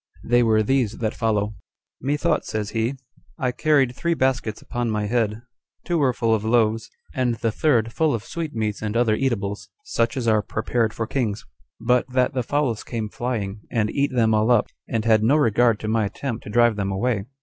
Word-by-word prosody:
They 120 Hz, +1 st, +3 dB
were 110 Hz, -2 st, +3 dB
these 125 Hz, -2 st, +1 dB
that 110 Hz, -1 st, -1 dB
follow:"Methought," 115 Hz, -, -2 dB
says 105 Hz, -1 st, -3 dB
he, 115 Hz, +4 st, -1 dB, 0.4 s
"I 130 Hz, -5 st, 0 dB
carried 135 Hz, -2 st, +2 dB
three 170 Hz, +4 st, 0 dB
baskets 130 Hz, -6 st, 0 dB
upon 120 Hz, -1 st, -3 dB
my 105 Hz, -1 st, -1 dB
head; 110 Hz, 0 st, 0 dB, 0.4 s
two 175 Hz, -2 st, 0 dB
were 135 Hz, -3 st, +3 dB
full 115 Hz, -2 st, +1 dB
of 110 Hz, -2 st, 0 dB
loaves, 110 Hz, -1 st, +1 dB, 0.2 s
and 125 Hz, -2 st, 0 dB
the 115 Hz, 0 st, -1 dB
third 115 Hz, -3 st, +1 dB
full 155 Hz, -5 st, +2 dB
of 110 Hz, -, -5 dB
sweetmeats 115 Hz, -11 st, -3 dB
and 110 Hz, +1 st, -2 dB
other 120 Hz, -2 st, +3 dB
eatables, 105 Hz, -6 st, -2 dB
such 125 Hz, -, -1 dB
as 120 Hz, -3 st, -2 dB
are 110 Hz, -1 st, +4 dB
prepared 110 Hz, +2 st, -1 dB
for 115 Hz, -, -3 dB
kings; 110 Hz, -4 st, -2 dB, 0.3 s
but 125 Hz, +3 st, +1 dB
that 125 Hz, 0 st, +1 dB
the 130 Hz, -, 0 dB
fowls 130 Hz, -3 st, -1 dB
came 110 Hz, -3 st, -4 dB
flying, 110 Hz, -5 st, -3 dB
and 110 Hz, -3 st, 0 dB
eat 140 Hz, 0 st, 0 dB
them 115 Hz, -3 st, +2 dB
all 110 Hz, +2 st, +2 dB
up, 120 Hz, -4 st, +3 dB, 0.2 s
and 115 Hz, -1 st, -1 dB
had 110 Hz, -2 st, +4 dB
no 120 Hz, +7 st, +4 dB
regard 120 Hz, -5 st, +3 dB
to 110 Hz, -, -4 dB
my 110 Hz, -1 st, +1 dB
attempt 115 Hz, +3 st, -5 dB
to -, -, -7 dB
drive 120 Hz, 0 st, +3 dB
them 100 Hz, -1 st, -1 dB
away." 100 Hz, +1 st, -1 dB
115 Hz, 195 wpm, -23 LUFS, 110-125 Hz, 0.4 s, are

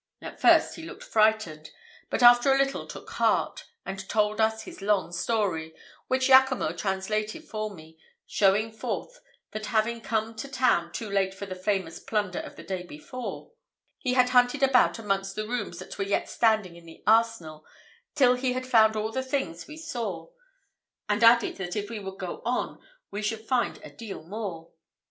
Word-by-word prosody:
At -, -, -10 dB
first -, -, +5 dB
he -, -, -8 dB
looked -, -, -9 dB
frightened, 215 Hz, -8 st, +1 dB, 0.4 s
but -, -, 0 dB
after 240 Hz, +2 st, +7 dB
a 270 Hz, -, +4 dB
little 275 Hz, 0 st, 0 dB
took -, -, -10 dB
heart, -, -, 0 dB, 0.2 s
and 195 Hz, 0 st, -6 dB
told 210 Hz, 0 st, +1 dB
us 220 Hz, 0 st, 0 dB
a -, -, -6 dB
long 200 Hz, -4 st, +1 dB
story, 175 Hz, -6 st, -1 dB, 0.3 s
which 260 Hz, 0 st, +1 dB
Jaccomo 260 Hz, -, +5 dB
translated 205 Hz, +4 st, -2 dB
for 215 Hz, -1 st, -3 dB
me, 160 Hz, -4 st, -14 dB, 0.3 s
showing 210 Hz, +3 st, +2 dB
forth, -, -, -5 dB, 0.3 s
that 215 Hz, 0 st, -5 dB
having 230 Hz, 0 st, 0 dB
come 225 Hz, 0 st, -1 dB
to 250 Hz, -, -5 dB
town 250 Hz, -11 st, +1 dB
too 220 Hz, -, -5 dB
late 195 Hz, -1 st, 0 dB
for 200 Hz, -, -6 dB
the 190 Hz, -, -6 dB
famous 185 Hz, -2 st, -2 dB
plunder 205 Hz, -4 st, -2 dB
of -, -, -8 dB
the -, -, -11 dB
day 190 Hz, -2 st, -4 dB
before, 180 Hz, -, -8 dB, 0.5 s
he 250 Hz, -4 st, -1 dB
had 250 Hz, -1 st, +4 dB
hunted 250 Hz, +2 st, +3 dB
about 260 Hz, -2 st, +4 dB
amongst 195 Hz, -3 st, -2 dB
the 215 Hz, 0 st, -3 dB
rooms 235 Hz, -7 st, -3 dB
that -, -, -8 dB
were -, -, +1 dB
yet 200 Hz, +1 st, 0 dB
standing 215 Hz, -6 st, +1 dB
in 170 Hz, -1 st, -15 dB
the 165 Hz, -, -14 dB
arsenal, 215 Hz, -8 st, +2 dB, 0.5 s
till 255 Hz, -4 st, +5 dB
he 250 Hz, 0 st, -1 dB
had 255 Hz, 0 st, -3 dB
found 220 Hz, -3 st, +5 dB
all 215 Hz, +1 st, -2 dB
the 260 Hz, -, -1 dB
things 260 Hz, -, -3 dB
we 305 Hz, -, -10 dB
saw; 245 Hz, -, -5 dB, 0.8 s
and 210 Hz, +2 st, +1 dB
added, 230 Hz, 0 st, +5 dB
that 180 Hz, -2 st, -5 dB
if 205 Hz, 0 st, -3 dB
we 225 Hz, -, -4 dB
would 195 Hz, -1 st, -7 dB
go 185 Hz, -2 st, -6 dB
on 245 Hz, +2 st, -2 dB, 0.3 s
we 205 Hz, -, -4 dB
should 220 Hz, +1 st, -3 dB
find 255 Hz, -2 st, +1 dB
a -, -, -10 dB
deal 215 Hz, -8 st, -8 dB
more. 175 Hz, -3 st, -6 dB
215 Hz, 180 wpm, -27 LUFS, 190-245 Hz, 0.8 s, after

